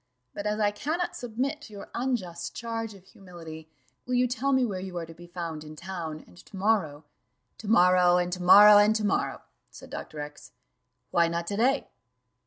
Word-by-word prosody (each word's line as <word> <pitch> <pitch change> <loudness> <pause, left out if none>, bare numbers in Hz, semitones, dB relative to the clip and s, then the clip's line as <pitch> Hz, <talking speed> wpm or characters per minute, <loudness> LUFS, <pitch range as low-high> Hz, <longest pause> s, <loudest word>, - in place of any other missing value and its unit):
But 205 - -4
as 210 +1 -1
I 205 -1 +2
cannot 315 +11 -3
submit 255 +6 -3
to 220 - -12
your 200 - -10
unjust 205 -10 -3
charge 225 -2 -4
of 190 -1 -17
humility, 165 -5 -11 0.4
will 250 - 0
you 250 0 +3
tell 260 +3 -1
me 260 -2 +3
where 195 -5 -3
you 185 -1 -6
are 170 - -3
to 165 - -12
be 175 +1 -14
found 170 -3 -6
in 155 0 -10
town, 170 -3 -6
and 90 - -20
to 190 - -12
morrow 185 -8 0 0.3
" - - -49
"To 220 - -9
morrow, 180 -3 +5
and 180 0 -1
to 180 - -4
morrow, 205 +3 +9
and 210 +1 +4
to 215 -1 0
morrow," 205 - -1 0.3
said - - -14
Dr. 155 - -7
X: 145 0 -10 0.6
"why 170 -1 +3
not 170 0 -3
to 200 - -3
day?" 260 +6 +1
190 Hz, 200 wpm, -27 LUFS, 170-225 Hz, 0.6 s, morrow